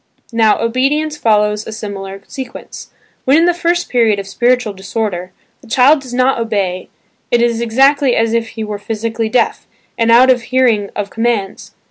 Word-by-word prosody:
Now, 220 -2 +3
obedience 275 +6 0
follows 210 -4 +1
a - - -5
similar 195 -2 -7
sequence. 260 -2 -9 0.3
When 270 +3 +4
in 330 - +4
the 355 - +3
first 345 0 -1
period 230 -4 +2
of 200 - -5
spiritual 240 +2 0
disorder, 190 -2 -4 0.3
the - - -17
child 265 +6 +4
does 255 -2 -11
not 255 +1 +1
obey 200 -5 -2 0.4
it 240 - +2
is 235 -1 +1
exactly 270 +3 +3
as 225 0 +1
if 230 -1 0
he 220 0 -7
were 210 -1 -5
psychically 225 +1 -3
deaf, 235 +1 0 0.3
and 230 0 +3
out 255 +3 +6
of 250 -2 +1
hearing 235 -5 +1
of 205 -1 -4
commands. 225 -4 -2
230 Hz, 170 wpm, -15 LUFS, 210-255 Hz, 0.4 s, out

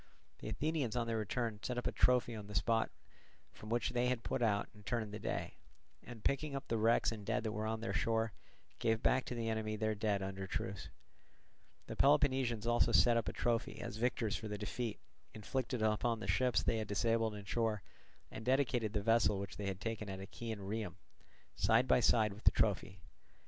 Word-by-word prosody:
The - - -6
Athenians 150 -7 -1
on 120 -1 0
their 115 -1 -1
return 110 0 -2
set 125 - -3
up 125 - -2
a - - +1
trophy 125 -1 +3
on 105 -2 -7
the 105 - -8
spot 115 +2 +2 0.6
from 110 - -11
which 120 +1 0
they 125 0 +1
had 125 -2 0
put 130 - -2
out 105 -3 +2
and 105 -1 -16
turned 110 -2 -2
the 105 - -5
day, - - -3 0.5
and 120 -3 -10
picking 140 +1 0
up 135 0 -5
the 115 - 0
wrecks 115 +2 +3
and 110 -2 -6
dead 110 +2 -1
that 110 - -1
were 105 +1 -2
on 110 0 -2
their 95 -3 -2
shore, 110 +1 +1 0.5
gave 110 0 +1
back 130 0 +3
to 125 - -4
the 115 -1 -2
enemy 110 -1 -1
their 110 0 0
dead 105 -2 0
under 95 0 -4
truce. 95 0 -4 1.0
The - - -6
Peloponnesians 130 -6 +3
also 120 0 +3
set 120 0 +6
up 115 - 0
a - - -6
trophy 115 -1 -1
as 105 - -5
victors 115 -2 0
for 110 - -4
the 105 0 -4
defeat 110 +2 -3 0.4
inflicted 120 +2 -2
upon 110 +2 +1
the - - -5
ships 125 -5 +2
they 115 - +1
had 110 - -3
disabled 115 +1 +1
in 100 -1 -8
shore, 110 -2 0 0.5
and 110 - -7
dedicated 125 -4 +1
the 105 -2 -1
vessel 115 -2 +4
which 100 +1 -6
they 100 - -3
had 95 -1 -3
taken 110 -1 -4
at 95 0 -5
Achaean 110 +2 -6
Rhium, 100 -2 -3 0.6
side - - +3
by - - +5
side 105 -2 +3
with 105 - -14
the - - +10
trophy. 100 -4 0
110 Hz, 205 wpm, -36 LUFS, 105-120 Hz, 1.0 s, the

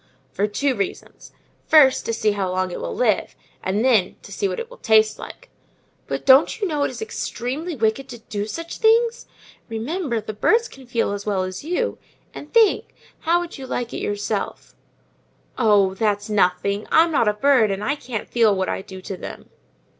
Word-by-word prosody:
"For 205 - 0
two 270 +6 0
reasons: 200 -5 -5 0.4
first, 280 -4 +5
to - - 0
see 215 -1 +1
how 200 -2 -2
long 185 0 -1
it - - -6
will 85 0 -4
live—and 205 +5 -1
then, 220 -8 +3
to - - -12
see 405 - -1
what 430 - -4
it 470 - -5
will - - -15
taste 220 -1 +3
like." - - -11 0.6
"But - - -4
don't 270 +9 +5
you 410 - 0
know 300 -4 -2
it 285 - +1
is - - -6
extremely 310 - -4
wicked 225 +3 0
to 240 - -8
do 215 -2 -5
such 330 +9 -6
things? 460 +1 +3 0.4
Remember, 240 +3 -2
the 215 0 -6
birds 455 - +2
can 265 - -15
feel 235 -4 0
as 205 +1 -5
well 195 -3 0
as 185 +3 -6
you; 360 +10 -2 0.3
and 295 - -10
think, 450 -3 +3 0.2
how 345 +1 +2
would 345 -4 -8
you 265 - -7
like 245 -2 -3
it - - -3
yourself?" 205 0 -3 0.8
"Oh, 205 -5 +3
that's 205 +1 -1
nothing! 200 +1 +1
I'm 330 +1 +5
not 255 -7 +2
a 210 - +3
bird, 245 -1 +3
and 195 +1 -3
I 280 - +1
can't 245 -6 -6
feel 225 -4 +3
what 190 0 -1
I - - -2
do 190 -1 -10
to 195 - -5
them." - - -9
230 Hz, 190 wpm, -22 LUFS, 205-300 Hz, 0.8 s, first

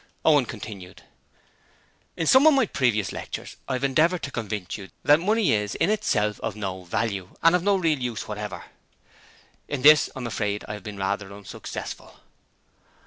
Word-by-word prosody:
Owen 145 -5 +5
continued: 100 -5 -9 1.1
'In 165 - -1
some 260 - +6
of 310 - +7
my 265 -3 +4
previous 115 - 0
lectures - - -7
I 135 - -2
have 130 +1 -2
endeavoured 155 +6 +2
to 140 - -4
convince 105 -6 -4
you 95 -2 -9
that 145 +2 +6
money 210 +3 +2
is 105 -1 -1
in 170 +5 +2
itself 105 - 0
of - - -4
no 95 -3 -5
value 100 -1 -3
and 165 +1 +6
of 180 - +2
no 200 +2 +3
real 165 -6 +1
use 120 -3 -4
whatever. 105 -3 -5 1.0
In 145 -3 -4
this 150 0 +7
I - - -6
am - - -4
afraid 105 -3 -2
I 105 - -5
have 105 - -7
been 105 -1 -7
rather 100 +1 -2
unsuccessful.' 100 0 -8
115 Hz, 175 wpm, -25 LUFS, 105-160 Hz, 1.1 s, of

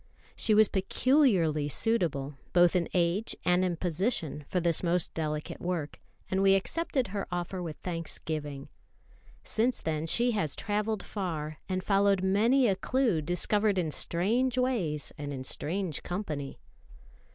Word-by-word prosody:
She 215 - +2
was 215 0 +6
peculiarly 190 - +2
suitable, 155 -9 +1 0.2
both 175 0 +5
in 175 -2 +1
age 180 +5 0
and 180 +1 +3
in 180 -2 0
position, 170 - -2
for 180 - 0
this 170 -2 +2
most 175 -1 0
delicate 150 -1 -4
work; 175 -4 -3 0.3
and 190 +1 0
we 195 0 +5
accepted 265 - -1
her 200 0 -4
offer 175 +1 -3
with 165 -3 -5
thanksgiving. 155 -4 -4 0.7
Since 235 +3 +1
then 160 0 -2
she 240 +8 +3
has 160 - -1
travelled 210 0 -2
far, 155 -7 -4
and 185 0 -1
followed 200 -1 +3
many 230 +7 +3
a 195 - +2
clue 230 -4 +1
discovered 200 +5 +1
in 165 -4 0
strange 235 - 0
ways 200 - -1
and 145 -1 -4
in 130 -2 -5
strange 170 +4 -2
company. 155 -7 -4
180 Hz, 140 wpm, -29 LUFS, 160-210 Hz, 0.7 s, was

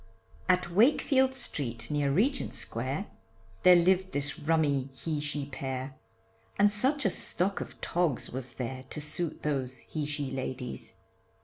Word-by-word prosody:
At 180 -1 +3
Wakefield 265 - +4
street, 140 - -1
near 145 -1 +1
Regent 245 - +1
Square, - - -2 0.6
There 180 -1 +8
lived 185 +2 +3
this 145 +3 0
rummy 145 -4 +1
he 155 +2 -2
she 150 -1 -2
pair, 130 -1 -4 0.6
And 205 +1 +5
such 265 +6 +1
a 195 - +4
stock 185 +2 +1
of - - -8
togs 170 -7 0
was 130 0 -6
there, 130 +1 -4
To - - -4
suit 155 +2 -3
those 130 -4 -1
he 150 +4 -4
she 145 -2 -3
ladies. 130 -5 -5
150 Hz, 140 wpm, -30 LUFS, 135-185 Hz, 0.6 s, There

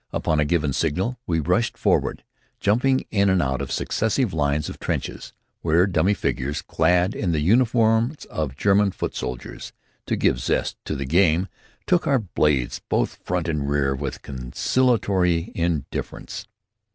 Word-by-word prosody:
Upon 80 - 0
a 75 - +3
given 75 -3 +1
signal, 95 - -1
we 80 -2 +1
rushed 90 +10 0
forward, - - +1 0.4
jumping 130 +6 +2
in 100 -1 +3
and 95 -1 +3
out 65 -3 0
of - - -5
successive 110 0 0
lines 75 -1 0
of - - -8
trenches, - - -4 0.3
where 85 +2 +3
dummy 100 +1 +2
figures 70 -4 -2
clad 90 +4 +2
in 90 -5 -1
the 80 - +1
uniforms 115 - +2
of 70 -4 -4
German 100 0 +3
foot - - -4
soldiers, 60 -1 -6 0.3
to - - +1
give 65 - +1
zest - - -1
to - - -3
the 70 - -3
game 85 +4 +3 0.4
took 180 -2 +2
our 140 - +4
blades 75 - 0
both - - 0
front 90 -2 -1
and 75 -4 -1
rear 70 -2 +1
with 70 0 -5
conciliatory 90 - +1
indifference. 85 -5 -3
85 Hz, 150 wpm, -23 LUFS, 75-105 Hz, 0.4 s, our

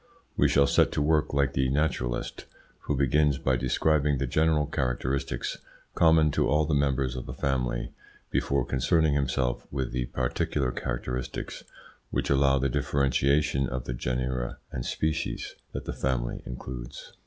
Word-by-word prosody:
We - - +4
shall 70 - +5
set - - +3
to - - 0
work 75 0 +2
like 70 -1 +1
the 65 -1 +1
naturalist, 65 -4 -1 0.4
who 75 - +1
begins 70 +1 +3
by 65 -1 +1
describing 70 +3 +2
the 70 - -1
general 75 +3 +2
characteristics 65 -2 -2 0.3
common 80 -2 +5
to - - +1
all 75 +2 +3
the 75 - -1
members 70 -3 +1
of 65 - -6
a - - -5
family 60 -3 -1 0.4
before 70 -3 +1
concerning 75 +5 +2
himself 65 -3 0
with 65 -3 -2
the 60 -1 -2
particular 65 +1 -1
characteristics 60 0 -4 0.5
which - - -1
allow 70 0 +4
the 70 0 +1
differentiation 70 0 +1
of 65 0 -3
the - - -4
genera 65 0 -2
and 60 -2 -4
species 80 -1 -2 0.2
that - - -5
the - - -3
family 60 -2 -1
includes. 60 +1 -7
65 Hz, 150 wpm, -28 LUFS, 65-70 Hz, 0.5 s, shall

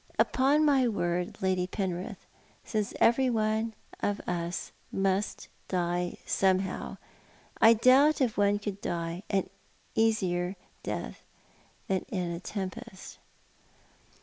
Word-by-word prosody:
Upon 285 +4 +3
my 270 -4 +4
word, 180 -1 -1
Lady 185 -1 +1
Penrith, 185 -2 -4 0.4
since 210 -2 -1
everyone 225 -3 +2 0.2
of 205 0 0
us 175 0 -3 0.2
must 195 +1 0 0.2
die 175 -1 -1
somehow, 190 0 0 0.6
I 225 +1 +8
doubt 265 +7 +5
if 250 -5 +1
one 205 0 +3
could 205 -1 -5
die 170 +1 -3 0.7
easier 190 -5 +1 0.3
than - - -4 0.7
in 185 -2 -1
a 170 - -4
tempest." 190 -1 -6
195 Hz, 95 wpm, -29 LUFS, 180-225 Hz, 0.7 s, I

